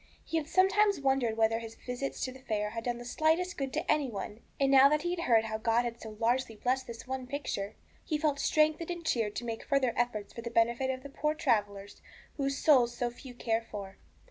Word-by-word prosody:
He 330 - -1
had 305 -2 -2
sometimes 400 +1 +3
wondered 265 -5 +1
whether 225 0 +3
his 225 -1 -8
visits 250 +2 -5
to 255 - -4
the 260 - -12
fair 210 -5 -2
had 230 0 -5
done 240 -1 -1
the 240 - -9
slightest 320 +7 +1
good 270 -2 -3
to 315 - 0
any 290 -4 +1
one, 210 0 -6 0.2
and 275 -1 +3
now 275 0 +8
that 300 +1 +1
he 350 0 0
heard 235 -10 +3
how 220 -1 -3
God 230 +2 +2
had 235 -1 -5
so 215 -1 -9
largely 235 0 +1
blessed 255 +4 -1
this 230 -1 -8
one 260 0 -4
picture, 250 -7 -4 0.3
he 310 - -1
felt 295 -2 0
strengthened 310 +3 +2
and 345 -1 -5
cheered 220 -7 0
to 240 - -4
make 225 -1 -4
further 275 -4 +1
efforts 220 -4 -1
for 235 - -7
the 235 - -5
benefit 235 +3 +2
of 260 0 -3
the 280 - -8
poor 300 +2 -1
travellers 205 -9 -1 0.4
whose 275 -1 -1
souls 245 -6 +4
so 240 -1 -1
few 250 +1 -12
care 225 -1 0
for. 200 -4 -8
250 Hz, 225 wpm, -31 LUFS, 225-285 Hz, 0.4 s, now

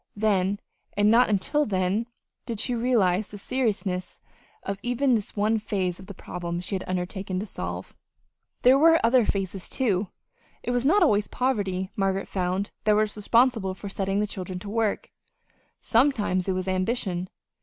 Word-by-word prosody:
Then, 200 -2 +1 0.4
and 205 +1 +4
not 240 +1 +5
until 215 +9 +1
then, 195 +1 0 0.4
did 230 -3 -4
she 250 - +1
realize 220 -5 +2
the 205 - -9
seriousness 205 -6 -2 0.4
of 195 0 -4
even 245 +3 +1
this 215 -3 -1
one 215 +2 +2
phase 190 -4 -2
of 190 - -12
the 200 - -9
problem 170 -1 -5
she 180 - -5
had 190 - -1
undertaken 185 +1 -3
to 205 - -3
solve. 90 - -6 0.7
There 260 +2 +6
were 325 +2 +6
other 240 0 +4
phases, 195 -2 -3
too. 210 -7 0 0.6
It - - -2
was 245 +2 +1
not 395 +5 +5
always 210 -9 +3
poverty, 200 -7 -1
Margaret 195 -1 0
found, 185 +2 -2
that 215 - +5
was 215 0 +1
responsible 220 -2 +2
for 200 +1 -7
setting 195 0 -1
the 210 - +2
children 185 -2 -6
to 200 - -7
work. 220 -2 -1 0.7
Sometimes 225 -7 +2
it 190 - +1
was 185 0 -3
ambition. 185 -1 -1
205 Hz, 165 wpm, -26 LUFS, 185-230 Hz, 0.7 s, There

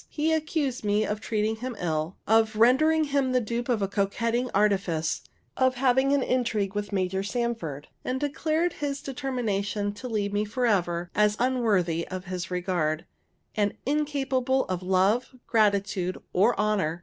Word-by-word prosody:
He 315 +1 0
accused 305 -5 -1
me 210 +1 +2
of 210 +1 -3
treating 220 0 -1
him 250 +1 -5
ill, 160 0 -2
of 220 0 +3
rendering 295 +8 +4
him 275 -3 0
the 255 - +4
dupe 240 +2 -3
of 215 -5 +1
coquetting 230 +5 0
artifice, 190 -6 +1 0.3
of 260 0 +2
having 265 +1 +3
an 280 -2 +3
intrigue 225 -7 0
with 205 0 -3
Major 190 -1 0
Sanford, 200 - -3 0.2
and 255 +1 -2
declared 310 +4 0
his 285 -1 -3
determination 215 -7 -2
to 230 +5 -7
leave 205 -3 -1
me 205 +1 +1
forever, 190 -7 0
as 210 0 +3
unworthy 210 -10 +1
of 185 0 -6
his 180 -1 -4
regard, 175 -4 -1 0.5
and 205 -1 0
incapable 270 -2 0
of 185 -1 -3
love, 190 +8 +1
gratitude, 200 -4 +1 0.2
or 210 +6 +3
honor. 195 -6 +1
215 Hz, 150 wpm, -27 LUFS, 195-255 Hz, 0.5 s, rendering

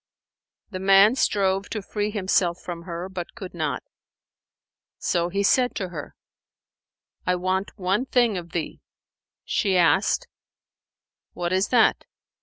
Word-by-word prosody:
The 185 - -5
man 195 +3 +6
strove 195 -5 +1
to 215 -3 -4
free 210 +1 -2
himself 185 -4 +1
from 170 -1 -7
her, 175 0 -5
but 185 -2 -7
could 195 -5 -8
not; 155 -6 -2 1.1
so 170 0 0
he 200 +3 -1
said 250 +4 +3
to 190 -4 -3
her, 155 -4 -8 1.1
"I 180 - +3
want 185 +3 -2
one 195 +6 0
thing 240 -5 +2
of 170 -2 -6
thee." 165 -2 -4 0.6
She 195 -3 +1
asked, 190 - +3 1.1
"What 175 0 -2
is 190 +3 +2
that?" 235 -3 +3
190 Hz, 130 wpm, -24 LUFS, 175-205 Hz, 1.1 s, man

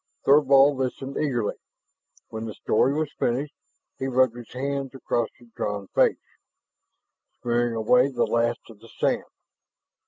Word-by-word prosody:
Thorvald 140 -1 +5
listened 135 +1 -3
eagerly. 125 -8 -1 0.7
When 110 0 -6
the 110 - -6
story 130 - +2
was 155 -2 -2
finished, 135 +5 -1 0.5
he 135 - -2
rubbed 130 -2 +2
his 120 -2 -11
hands 135 +1 -3
across 120 -3 -1
his 120 -1 -20
drawn 105 -3 -4
face, - - +3 1.3
smearing 120 -1 0
away 125 +4 +4
the 125 -4 0
last 115 0 0
of 105 - -16
the 115 +1 -16
sand. - - -1
125 Hz, 135 wpm, -25 LUFS, 115-135 Hz, 1.3 s, Thorvald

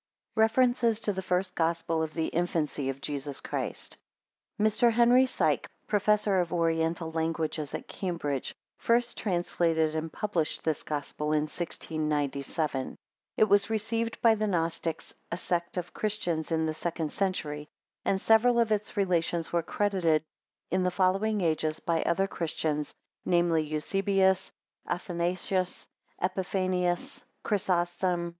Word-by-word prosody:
REFERENCES 235 0 +3
TO 215 -2 -1
THE 190 - -3
FIRST 185 0 0
GOSPEL 165 -1 0
OF 160 -1 -3
THE 160 -1 0
INFANCY 155 -5 -1
OF 135 0 -4
JESUS 140 -1 -4
CHRIST - - -4 0.6
[Mr. 220 +3 +4
Henry 240 +3 +5
Sike, - - 0 0.2
Professor 205 -1 +2
of 175 -2 0
Oriental 165 -1 0
Languages 160 -2 -2
at - - -6
Cambridge, 165 -8 -3 0.2
first 240 +1 +2
translated 170 -4 +1
and 160 0 -3
published 175 -7 -1
this 160 -3 0
Gospel 150 +1 -3
in 150 - +3
1697. 150 -3 -2 0.4
It - - +6
was 200 -1 +4
received 225 +1 -1
by 230 -1 +7
the 215 0 0
Gnostics, 165 -3 -2 0.2
a 170 - -1
sect 175 0 -2
of 175 -1 -4
Christians 175 -7 -2
in 160 -1 +2
the 155 - -1
second 160 -1 -3
century; 150 -6 -2 0.4
and 190 - +1
several 235 +3 +5
of 230 -2 +2
its 210 0 -1
relations 170 -4 0
were 170 - +3
credited 170 -4 +1 0.5
in 185 +2 +2
the 180 - +2
following 195 +4 +1
ages 155 -2 0
by 165 -1 0
other 195 +3 +2
Christians, 155 -4 -2 0.3
viz., 170 -3 +2
Eusebius, 190 +4 +2 0.4
Athanasius, 180 +1 -1 0.3
Epiphanius; 185 -1 -1 0.2
Chrysostom. 175 -3 0
175 Hz, 130 wpm, -29 LUFS, 160-200 Hz, 0.6 s, by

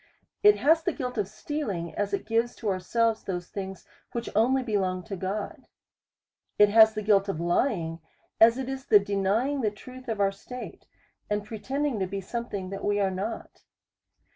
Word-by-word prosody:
It 415 0 +7
has 320 +3 +4
the - - -1
guilt 250 -5 -4
of 200 - 0
stealing, 215 - -4
as 205 -1 -2
it 200 - -2
gives 230 +2 0
to 220 - -3
ourselves 220 +4 +1
those 180 -2 -4
things 190 -2 -6 0.3
whicli 235 0 -3
only 255 +5 +3
belong 190 -5 -1
to 200 - -6
God. 195 +3 -4 0.9
It 210 0 +7
has 220 +1 +7
the 215 - -3
guilt 200 -1 +3
of 190 - -2
lying, 170 -2 0 0.4
as 230 +2 +7
it 265 -1 -3
is 265 0 -5
the 215 - +8
denying 205 +7 0
the 215 - +2
truth 255 +5 -12
of 225 -3 -2
our 195 -1 +3
state, 250 +5 -9 0.4
and 210 0 -1
pretending 260 +4 -2
to 190 - 0
be 195 +1 -4
something 200 -3 -5
that 195 - -6
we 205 0 +1
are 195 -1 +2
not. 195 +5 -5
210 Hz, 180 wpm, -27 LUFS, 195-240 Hz, 0.9 s, the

